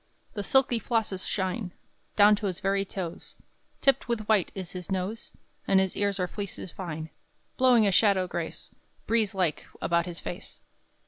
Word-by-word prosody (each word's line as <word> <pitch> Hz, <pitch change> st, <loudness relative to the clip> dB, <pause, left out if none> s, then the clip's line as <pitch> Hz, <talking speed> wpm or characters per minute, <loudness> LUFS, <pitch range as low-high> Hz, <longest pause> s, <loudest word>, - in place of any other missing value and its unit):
The 205 Hz, -, -3 dB
silky 250 Hz, 0 st, +3 dB
flosses 220 Hz, -6 st, -1 dB
shine 190 Hz, 0 st, -2 dB, 0.4 s
Down 210 Hz, 0 st, +7 dB
to 205 Hz, -, -2 dB
his 185 Hz, -2 st, -3 dB
very 195 Hz, +1 st, +1 dB
toes: 180 Hz, -3 st, -5 dB, 0.5 s
Tipped 275 Hz, -, +3 dB
with 225 Hz, -3 st, -2 dB
white 210 Hz, -5 st, +3 dB
is 185 Hz, -3 st, -6 dB
his 180 Hz, -2 st, -7 dB
nose: 190 Hz, +4 st, -3 dB, 0.4 s
And 190 Hz, -, +5 dB
his 190 Hz, -1 st, 0 dB
ears 200 Hz, -1 st, 0 dB
are 180 Hz, -, +1 dB
fleeces 200 Hz, -2 st, -6 dB
fine, 160 Hz, -4 st, -6 dB, 0.4 s
Blowing 250 Hz, -4 st, +5 dB
a 200 Hz, -, +3 dB
shadow 195 Hz, -1 st, +4 dB
grace -, -, -5 dB, 0.3 s
Breeze 220 Hz, -3 st, +2 dB
like 180 Hz, -5 st, 0 dB
about 170 Hz, 0 st, +1 dB
his 175 Hz, -1 st, -5 dB
face. 175 Hz, -, -8 dB
195 Hz, 165 wpm, -28 LUFS, 180-215 Hz, 0.5 s, Down